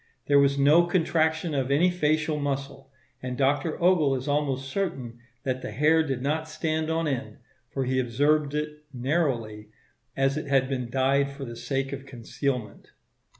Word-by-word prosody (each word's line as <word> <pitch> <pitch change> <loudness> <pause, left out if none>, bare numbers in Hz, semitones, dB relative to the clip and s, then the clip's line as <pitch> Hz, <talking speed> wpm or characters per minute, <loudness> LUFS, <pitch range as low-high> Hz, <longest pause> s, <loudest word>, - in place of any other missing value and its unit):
There 145 -1 +5
was 140 0 +3
no 150 +5 +5
contraction 160 -2 +1
of 135 -2 -1
any 165 +6 +3
facial 155 -2 0
muscle, 140 -1 -4 0.3
and 125 -1 -4
Dr. 145 +4 +1
Ogle 170 -6 +3
is 130 +2 -5
almost 140 -2 0
certain 135 -10 -3 0.2
that 130 -1 -2
the - - -5
hair 150 +8 +3
did 135 -5 -3
not 155 +3 -1
stand 155 0 -2
on 165 0 0
end, 135 -2 -3 0.3
for 135 -1 -2
he 130 +1 0
observed 145 +4 +1
it 150 0 -4
narrowly, 125 -6 -1 0.5
as 135 +1 +2
it 155 - -4
had 135 -2 +2
been 125 -3 -3
dyed 135 +2 +2
for 140 0 -7
the 120 -1 -7
sake 135 +3 -3
of 135 0 -7
concealment. 125 -2 -4
140 Hz, 165 wpm, -26 LUFS, 130-155 Hz, 0.5 s, There